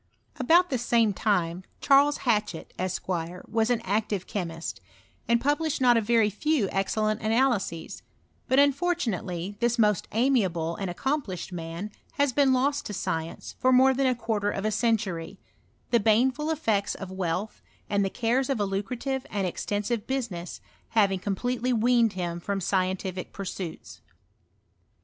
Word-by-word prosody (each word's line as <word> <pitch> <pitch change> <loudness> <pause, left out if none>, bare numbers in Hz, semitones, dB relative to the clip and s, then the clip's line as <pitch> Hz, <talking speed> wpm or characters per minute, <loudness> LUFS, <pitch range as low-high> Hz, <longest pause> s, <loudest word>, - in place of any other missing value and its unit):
About 335 +7 +4
the 255 - 0
same 230 -3 +2
time, 180 -3 0 0.2
Charles 285 +1 +4
Hatchett, 210 -8 0
Esq., 185 0 -3
was 180 +6 -2
an 240 -2 +1
active 205 -2 -1
chemist, 165 -4 -5 0.5
and 235 0 +3
published 295 +3 0
not 245 -2 +5
a 230 - +3
few 230 +7 +2
very - - -5
excellent 215 +2 0
analyses; 220 -7 0 0.5
but 260 - +2
unfortunately 240 - +1
this 240 0 +1
most 210 -4 +2
amiable 195 -10 +1
and 195 -2 -3
accomplished 195 - -3
man 170 +4 -5 0.2
has 285 -4 +1
been 280 -1 +4
lost 280 +3 +1
to 210 - -5
science 160 -3 -4
for 255 - +3
more 260 +1 +6
than 270 +1 +1
a 255 - +2
quarter 220 -3 -1
of 200 0 -3
a 215 - +1
century; 205 -6 -1 0.5
the 235 - +5
baneful 250 +8 +2
effects 225 -11 0
of 195 -2 -7
wealth, 190 +2 -3 0.3
and 200 -1 +1
the 195 - 0
cares 245 +6 0
of 270 -5 0
a 205 - +2
lucrative 250 +7 -3
and 200 -2 -1
extensive 205 +5 -2
business, 225 -11 -4 0.3
having 195 -4 +2
completely 245 +6 -1
weaned 235 -1 +3
him 175 -2 -3
from 200 +3 -2
scientific 185 0 -1
pursuits. 185 -3 -7
215 Hz, 145 wpm, -27 LUFS, 190-255 Hz, 0.5 s, more